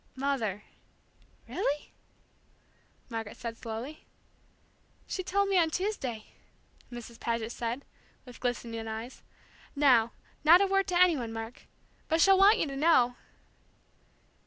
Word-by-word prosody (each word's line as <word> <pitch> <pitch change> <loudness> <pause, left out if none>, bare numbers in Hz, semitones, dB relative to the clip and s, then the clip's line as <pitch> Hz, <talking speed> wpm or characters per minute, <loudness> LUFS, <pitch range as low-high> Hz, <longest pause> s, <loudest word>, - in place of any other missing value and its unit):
"Mother 250 -7 -1 0.8
really?" 295 -6 -2 1.2
Margaret 225 -3 -6
said 230 -1 -5
slowly. 235 +6 -7 1.0
"She 375 - -3
told 400 +2 +1
me 390 -2 +3
on 330 -2 +3
Tuesday,." 315 - -3 0.7
Mrs. 235 -1 -9
Paget 230 -1 -2
said, 240 +3 -4 0.4
with 250 -2 -12
glistening 230 -2 -3
eyes. 225 +3 -6 0.5
"Now, 250 -5 +4 0.3
not 330 +4 +8
a 400 - +4
word 390 0 +1
to 355 -2 +1
any 360 -2 +6
one, 235 -3 -4
Mark, 225 +2 -7 0.4
but 320 - +1
she'll 385 +2 +6
want 405 +3 +7
you - - +1
to 275 -2 -5
know!" 270 -5 +4
255 Hz, 125 wpm, -30 LUFS, 230-340 Hz, 1.2 s, not